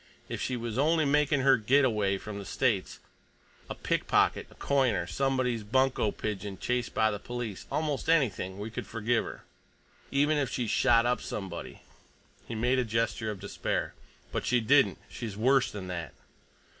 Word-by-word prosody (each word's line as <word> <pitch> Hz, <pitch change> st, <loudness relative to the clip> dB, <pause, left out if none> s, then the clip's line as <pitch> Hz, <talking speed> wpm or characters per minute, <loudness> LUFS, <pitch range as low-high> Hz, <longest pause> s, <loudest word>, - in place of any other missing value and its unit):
If -, -, -5 dB
she 130 Hz, -, -1 dB
was 115 Hz, 0 st, -3 dB
only 160 Hz, +2 st, +3 dB
making 145 Hz, 0 st, +3 dB
her 135 Hz, -1 st, +5 dB
get 130 Hz, +6 st, +4 dB
away 105 Hz, -5 st, +1 dB
from 100 Hz, +1 st, -7 dB
the -, -, -6 dB
States, 110 Hz, -6 st, 0 dB, 0.7 s
a -, -, -4 dB
pickpocket, -, -, +1 dB
a -, -, -18 dB
coiner, 135 Hz, -5 st, +1 dB
somebody's 130 Hz, -4 st, 0 dB
bunco 130 Hz, +1 st, +2 dB
pigeon 100 Hz, -2 st, -4 dB
chased 125 Hz, +4 st, -2 dB
by 110 Hz, 0 st, +3 dB
the 105 Hz, -, -4 dB
police—almost 120 Hz, +7 st, -3 dB
anything—we 110 Hz, -, +1 dB
could -, -, -5 dB
forgive 115 Hz, +1 st, 0 dB
her. -, -, -8 dB, 0.7 s
Even 145 Hz, +2 st, +2 dB
if 135 Hz, -, 0 dB
she'd 120 Hz, -4 st, -2 dB
shot 115 Hz, 0 st, +4 dB
up 125 Hz, 0 st, +1 dB
somebody—" 95 Hz, -4 st, -6 dB, 0.7 s
He 115 Hz, -, -5 dB
made 125 Hz, +4 st, +2 dB
a -, -, +2 dB
gesture 115 Hz, -1 st, -1 dB
of 105 Hz, -3 st, -5 dB
despair. 100 Hz, +1 st, -2 dB, 0.4 s
"But -, -, -2 dB
she 125 Hz, -, +2 dB
didn't. 135 Hz, +5 st, +4 dB
She's 110 Hz, -5 st, -6 dB
worse 130 Hz, +4 st, +3 dB
than 100 Hz, -3 st, -7 dB
that!" 85 Hz, -6 st, -5 dB
120 Hz, 160 wpm, -29 LUFS, 105-135 Hz, 0.7 s, her